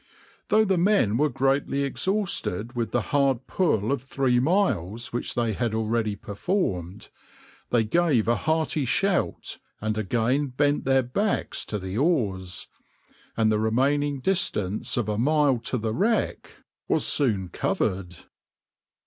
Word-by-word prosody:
Though 220 +1 +4
the 190 -3 +1
men 180 - +3
were 150 +3 +2
greatly 135 +1 0
exhausted 140 - -1
with 115 -2 -1
the 120 +3 -2
hard 135 -4 +2
pull 125 - 0
of 140 - 0
three 130 -2 +1
miles 120 - 0
which 120 - -2
they 115 -2 0
had 115 +1 -1
already 110 -1 0
performed, 100 - -3 0.6
they 120 -2 +3
gave 135 -1 +2
a 120 - +3
hearty 155 0 0
shout 185 +9 -1 0.2
and 110 0 -2
again 120 +7 0
bent 145 +3 0
their 135 -1 +3
backs 200 - -1
to 105 - -3
the 95 +2 -4
oars, 100 - 0 0.7
and 110 -1 +3
the 105 - +1
remaining 140 +5 +1
distance 125 - 0
of 120 -4 0
a 105 0 -1
mile 145 -1 +3
to 120 +2 -2
the 110 -1 -2
wreck 220 - 0 0.4
was - - +2
soon 105 - +2
covered. 90 +1 -2
125 Hz, 140 wpm, -25 LUFS, 110-150 Hz, 0.7 s, Though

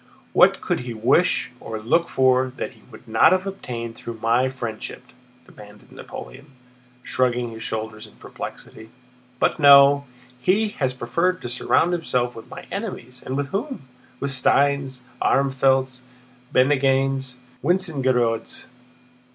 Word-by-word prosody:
"What - - +5
could - - -1
he 125 -2 -6
wish 125 +11 +2
or 110 - -6
look 165 +10 +1
for 130 0 +2
that - - -4
he 115 -3 -21
would 110 -1 -15
not 110 +9 +5
have 185 +1 0
obtained 120 -12 -6
through 115 -1 -8
my 120 +4 +2
friendship?" 120 -2 -6 0.4
demanded 105 0 -16
Napoleon, 135 +3 -10 0.6
shrugging 125 -2 0
his 115 0 -9
shoulders 110 -1 -5
in - - -19
perplexity. 110 0 -9 0.5
"But - - +1
no, 140 0 +7 0.4
he 205 +10 +2
has 130 -3 0
preferred 170 +10 0
to 120 - -4
surround 160 +7 +2
himself 125 -8 -1
with 115 - -11
my - - -9
enemies, 130 - -6
and 130 - -4
with 140 -1 -2
whom? 235 - -4 0.4
With 140 - -2
Steins, 135 0 +1 0.2
Armfeldts, 130 -1 +2 0.5
Bennigsens, 135 -1 +2
and 125 - -26 0.2
Wintzingerodes! 135 -10 0
130 Hz, 135 wpm, -22 LUFS, 120-140 Hz, 0.6 s, no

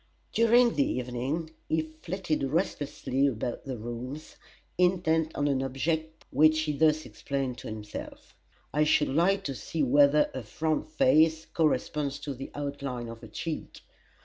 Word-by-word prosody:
During 235 +1 +5
the 140 - +2
evening 130 +6 -3 0.2
he 160 0 +2 0.2
flitted 170 -3 -2
restlessly 140 -2 0
about 120 -1 -3
the 130 -3 -4
rooms, 120 +6 -7 0.4
intent 170 -3 +2
on 145 - +1
an 135 -2 +1
object 160 +5 -2
which 155 +1 +5
he 155 -1 -1
thus 155 +1 +3
explained 135 -3 -3
to - - -8
himself: 105 -1 -8 0.4
"I 150 +1 +3
should 150 0 +3
like 175 +8 +2
to 140 - -3
see 140 +7 -3
whether 145 +3 +5
her 130 - -4
front 155 - -2
face 160 - +4
corresponds 150 -3 0
to 145 -1 -4
the 135 +1 -7
outline 140 -4 -4
of 115 0 -9
her 115 - -9
cheek. 155 +8 -5
150 Hz, 145 wpm, -29 LUFS, 130-160 Hz, 0.4 s, During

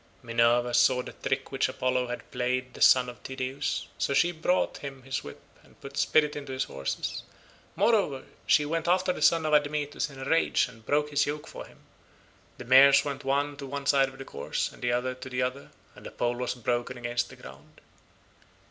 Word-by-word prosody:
Minerva 120 +1 +2
saw 125 0 +4
the - - -8
trick 135 0 -3
which 135 -1 0
Apollo 130 -1 -1
had 120 - -7
played 125 0 -2
the - - -12
son 125 -1 +6
of 120 -1 -9
Tydeus, 130 +2 -3
so 140 - 0
she 175 - +4
brought 175 +2 0
him 135 -2 -8
his 135 0 -3
whip 70 - -10 0.2
and - - -23
put 140 0 -10
spirit 150 0 +2
into 140 -2 -6
his 130 +1 0
horses; 70 0 -4 0.5
moreover 195 - +2 0.2
she 150 - +4
went 165 +2 -2
after 180 +1 +2
the - - -8
son 165 -1 +4
of 155 - 0
Admetus 145 +1 +1
in 135 - -13
a 135 - -6
rage 165 -2 +2
and 115 -3 -15
broke 150 +1 +1
his 145 0 +2
yoke 150 +1 -4
for - - -9
him; - - -20 0.8
the 125 - -9
mares 135 +3 +7
went 140 -1 -4
one 140 +2 0
to 140 -1 -7
one 140 +1 -5
side 135 -1 +3
of 135 - -14
the 135 - -8
course, 70 - -3
and - - -16
the 120 - 0
other 125 +1 0
to 130 +1 -10
the 125 0 -1
other, 130 +2 -4 0.2
and - - -15
the - - -7
pole 120 0 -1
was 125 0 -2
broken 120 +1 -2
against 120 0 -2
the - - -12
ground. - - -14
135 Hz, 210 wpm, -28 LUFS, 125-145 Hz, 0.8 s, mares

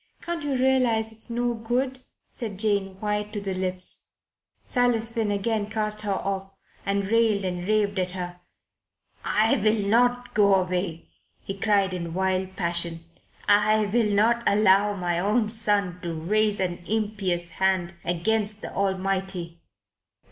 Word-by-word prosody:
Can't 340 -1 -3
you 290 -2 -1
realize 250 -4 +2
it's 225 +2 -7
no 240 +1 0
good?" 245 +3 -2 0.3
said 215 -5 -6
Jane, 200 -2 0
white 210 0 -2
to 210 - -2
the 195 -1 -3
lips. 185 0 -1 0.5
Silas 240 -2 +1
Finn 225 -2 -1
again 205 +1 -1
cast 215 -1 -1
her 205 -2 -1
off 195 0 -3 0.4
and 200 0 +1
railed 220 -2 +2
and 180 0 -3
raved 205 -2 +1
at 185 0 0
her. 175 0 -5 0.8
"I 220 +1 +2
will 215 0 +1
not 245 +3 +2
go 200 -2 +5
away," 180 -3 -2 0.3
he 195 - -4
cried 195 -2 +2
in 170 -2 -4
wild 190 0 -1
passion. 170 -2 -2 0.4
"I 210 +1 +4
will 230 -3 +3
not 220 +4 +3
allow 205 0 +4
my 175 -2 -1
own 210 +4 +1
son 205 -5 +1
to 170 -3 -4
raise 210 +6 +1
an 180 -2 -1
impious 200 -5 -1
hand 190 -2 +1
against 210 +5 0
the - - -6
Almighty." 190 -3 -2
205 Hz, 145 wpm, -25 LUFS, 185-220 Hz, 0.8 s, go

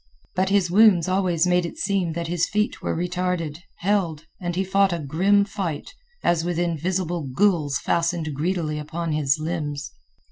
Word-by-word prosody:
But 185 +1 +1
his 195 -3 +2
wounds 190 -4 +6
always 185 -3 +2
made 180 0 +3
it 170 - -6
seem 195 - 0
that 170 +1 -3
his 170 0 0
feet 210 +1 -1
were - - -2
retarded, 180 -3 -2 0.2
held, 175 -5 0
and 175 -2 -3
he 190 - +1
fought 195 0 +3
a 170 - -1
grim 185 +7 +2
fight, 195 - -4 0.3
as 170 -2 +2
with 175 -1 -2
invisible 175 -2 -1
ghouls 170 -8 +2
fastened 165 0 0
greedily 155 0 -1
upon 160 +2 -4
his 150 -1 +2
limbs. 150 -4 -3
175 Hz, 165 wpm, -24 LUFS, 160-185 Hz, 0.3 s, wounds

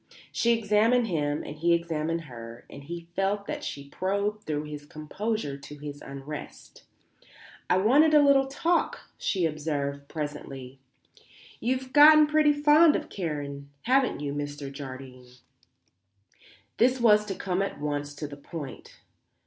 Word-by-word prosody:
She 235 0 +2
examined 225 +3 +3
him 150 -7 -1
and 150 - -8
he 170 +2 +3
examined 165 -1 -2
her 115 -5 -10
and 140 0 -10
he 170 +2 -7
felt 200 +1 0
that - - -5
she 140 0 -6
probed 200 +6 -2
through 150 -1 -2
his 150 -1 -8
composure 155 +1 -3
to 145 +1 -11
his 145 0 -8
unrest. 140 +2 -9 0.8
"I 180 - +4
wanted 285 +11 +5
a 295 - +7
little 275 -1 +5
talk," 335 +6 0 0.2
she 185 -4 0
observed 145 -2 -3
presently. 140 -4 -6 0.8
"You've 255 +2 -2
gotten 305 +1 +9
pretty 300 0 +4
fond 295 +2 +5
of - - -3
Karen, 145 -5 -5
haven't 255 - +2
you, 140 -1 -3
Mr. 145 -1 -5
Jardine?" 130 -2 -9 1.5
This 255 +2 +3
was 210 -3 +5
to 195 - -3
come 185 0 -1
at 195 - -3
once 145 0 -3
to 150 0 -5
the 145 0 -10
point. 145 -1 -9
160 Hz, 140 wpm, -27 LUFS, 145-225 Hz, 1.5 s, gotten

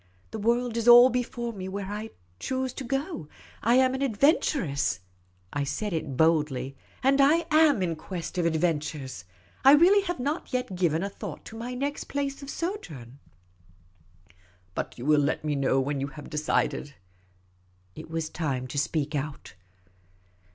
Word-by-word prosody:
" 90 - -34
The 220 - -5
world 235 +2 +1
is 230 0 -1
all 240 +2 +9
before 240 -1 -2
me 190 -2 -6
where 200 +1 -4
to 210 +3 -5 0.3
choose. 260 - -2 0.9
I 235 +2 +3
am 260 0 +4
an 265 - -3
adventuress," 245 - +1 0.5
I 145 - 0
said 175 +9 -3
it 150 -5 -3
boldly, 145 -5 +1
" - - -28
and 275 +1 +4
I 315 +4 +4
am 305 -9 +5
in 170 -2 -1
quest 175 +2 -6
of 170 - +2
adventures. 150 - -2 0.4
I 270 +1 +9
really 360 +7 +6
have 350 -5 -3
not 290 +6 -3
yet 250 -7 -2
given 170 -2 +1
a - - -1
thought - - -8
to 225 - -10
my 240 +2 -5
next 285 +3 -3
place 280 0 -3
of 275 - -8
sojourn," 150 - -5 0.8
" 90 +2 -31
But - - -4
you 120 - -7
will 150 0 +4
let 145 +2 -1
me 150 - 0
know 135 -1 +2
when 140 +1 -1
you 140 - -1
have 145 0 -11
decided? 150 -2 -1 0.5
" 90 0 -37
It - - -9
was 165 -1 -2
time 140 -7 -3
to 145 - -1
speak 150 0 -1
out. 145 0 -4
170 Hz, 170 wpm, -27 LUFS, -, 0.9 s, all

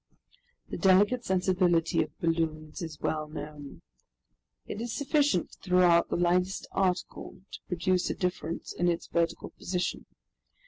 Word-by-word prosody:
The - - -5
delicate 205 +6 +4
sensibility 180 -3 +2
of - - -5
balloons 160 0 -1
is 160 -3 -6
well 155 -1 -1
known. 150 -2 -9 0.8
It 210 - -5
is 235 0 -3
sufficient 285 - +1
to - - -17
throw 180 0 +5
out 170 0 +4
the - - -1
lightest 180 +2 +1
article 185 -1 -2
to - - -7
produce 180 +1 0
a - - -2
difference 180 -2 -3
in 175 - 0
its 170 -1 0
vertical 170 0 -1
position. 180 0 -3
180 Hz, 140 wpm, -29 LUFS, 165-185 Hz, 0.8 s, throw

